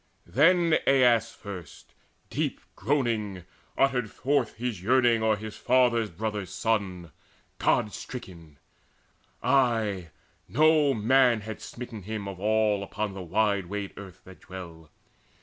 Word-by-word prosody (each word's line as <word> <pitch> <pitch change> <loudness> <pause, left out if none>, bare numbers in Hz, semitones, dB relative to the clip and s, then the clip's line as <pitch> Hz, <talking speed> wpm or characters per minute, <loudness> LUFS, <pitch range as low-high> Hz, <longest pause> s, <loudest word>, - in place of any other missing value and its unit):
Then 170 +3 +4
Aias 120 -4 +4
first, 95 -8 -10 0.4
deep - - -2 0.2
groaning, 110 - -1 0.3
uttered 125 -5 +2
forth 135 -1 0
His 115 -6 -4
yearning 120 +1 +3
o'er 110 -1 +3
his 105 +1 -8
father's 120 -3 +2
brother's 105 +1 -4
son 95 -4 -2 0.5
God 105 - +2
stricken 85 - -9 0.9
ay, 115 -9 +1 0.4
no 150 0 +4
man 120 +1 +4
had 110 0 -7
smitten 120 -3 -8
him 105 +1 -5
Of 95 -2 -7
all 105 0 +2
upon 100 +1 -4
the 95 - -7
wide 100 +1 0
wayed 100 +1 -5
earth 95 -2 -11
that 95 0 -14
dwell! 85 -4 -10
110 Hz, 120 wpm, -27 LUFS, 95-125 Hz, 0.9 s, Then